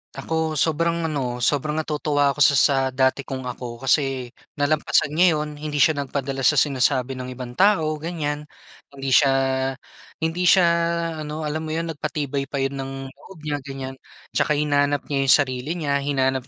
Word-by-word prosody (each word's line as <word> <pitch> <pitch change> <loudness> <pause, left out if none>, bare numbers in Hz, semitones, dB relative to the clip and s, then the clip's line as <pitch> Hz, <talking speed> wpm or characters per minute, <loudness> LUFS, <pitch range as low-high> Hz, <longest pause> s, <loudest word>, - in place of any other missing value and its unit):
Ako, 160 -1 -2
sobrang 170 +3 +1
ano, 130 -6 -2
sobrang 150 +3 +1
natutuwa 150 -2 +1
ako 150 - -9
sa 140 -1 +6
sa 140 +2 +4 0.2
dati 130 +1 +1
kong 130 -1 -5
ako. 125 0 -7
Kasi 135 -2 +1 0.2
nalampasan 145 0 +1
niya 170 +1 +4
'yon. 150 -1 -4
Hindi 150 -2 +1
siya 155 -3 +2
nagpadala 135 -1 -1
sa - - +4
sinasabi 130 -2 +2
ng 125 - -5
ibang 125 -1 -7
tao, 190 -6 +4
ganyan. 150 -3 -4 0.4
Hindi 135 -1 -5
siya 135 +1 +5 0.9
hindi 175 +2 0
siya 185 0 +6 0.6
ano, 155 +1 -5
alam 150 +1 -2
mo 155 - -3
'yon, 165 0 -2
nagpatibay 145 -2 -3
pa 140 - -7
'yon 135 0 -1
ng 135 0 -5 0.2
loob 190 +4 -15
niya, 145 -1 -2
ganyan. 135 -1 -7 0.4
Tsaka 150 - +1
hinanap 145 -1 +1
niya 135 -1 +1
yung - - +8
sarili 130 +3 -5
niya, 145 -4 0
hinanap 130 -2 0
145 Hz, 170 wpm, -23 LUFS, 135-155 Hz, 0.9 s, yung